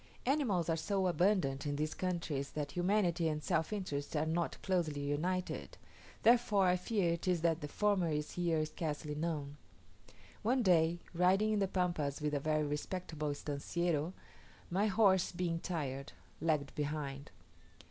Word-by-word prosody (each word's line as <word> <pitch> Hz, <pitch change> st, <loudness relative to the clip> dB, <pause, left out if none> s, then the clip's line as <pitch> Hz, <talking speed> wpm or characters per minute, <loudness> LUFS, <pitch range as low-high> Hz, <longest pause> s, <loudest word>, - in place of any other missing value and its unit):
Animals 240 Hz, -, +1 dB
are 165 Hz, -, +2 dB
so 190 Hz, +4 st, 0 dB
abundant 175 Hz, -7 st, +2 dB
in 145 Hz, -, -1 dB
these 155 Hz, +1 st, -1 dB
countries, 165 Hz, -6 st, -2 dB
that 145 Hz, -1 st, -3 dB
humanity 175 Hz, -2 st, +2 dB
and 150 Hz, -1 st, -2 dB
self 165 Hz, -1 st, 0 dB
interest 160 Hz, -9 st, -3 dB
are 150 Hz, +1 st, +2 dB
not 165 Hz, +1 st, -1 dB
closely 165 Hz, -6 st, 0 dB
united; 175 Hz, +6 st, -2 dB, 0.5 s
therefore 225 Hz, -4 st, +5 dB
I 180 Hz, 0 st, +4 dB
fear 180 Hz, -2 st, +1 dB
it 170 Hz, -, -5 dB
is 180 Hz, -3 st, +2 dB
that 165 Hz, -1 st, +2 dB
the 145 Hz, -, -3 dB
former 195 Hz, +1 st, +1 dB
is 150 Hz, -1 st, -2 dB
here 165 Hz, -3 st, +1 dB
scarcely 155 Hz, -1 st, -4 dB
known. 150 Hz, -2 st, -3 dB, 0.8 s
One 245 Hz, +3 st, +2 dB
day, 170 Hz, -2 st, +3 dB
riding 190 Hz, +5 st, +3 dB
in 210 Hz, -, +2 dB
the 195 Hz, -, +2 dB
Pampas 170 Hz, -7 st, -1 dB
with 150 Hz, -1 st, -1 dB
a 145 Hz, -, +1 dB
very 155 Hz, +1 st, +1 dB
respectable 150 Hz, +1 st, -3 dB
"estanciero," 150 Hz, +3 st, -1 dB, 0.6 s
my 200 Hz, +4 st, +2 dB
horse, 190 Hz, -3 st, +4 dB
being 175 Hz, -2 st, -1 dB
tired, 140 Hz, -7 st, -4 dB, 0.3 s
lagged 155 Hz, -3 st, 0 dB
behind. 145 Hz, -1 st, -3 dB
170 Hz, 150 wpm, -35 LUFS, 150-185 Hz, 0.8 s, therefore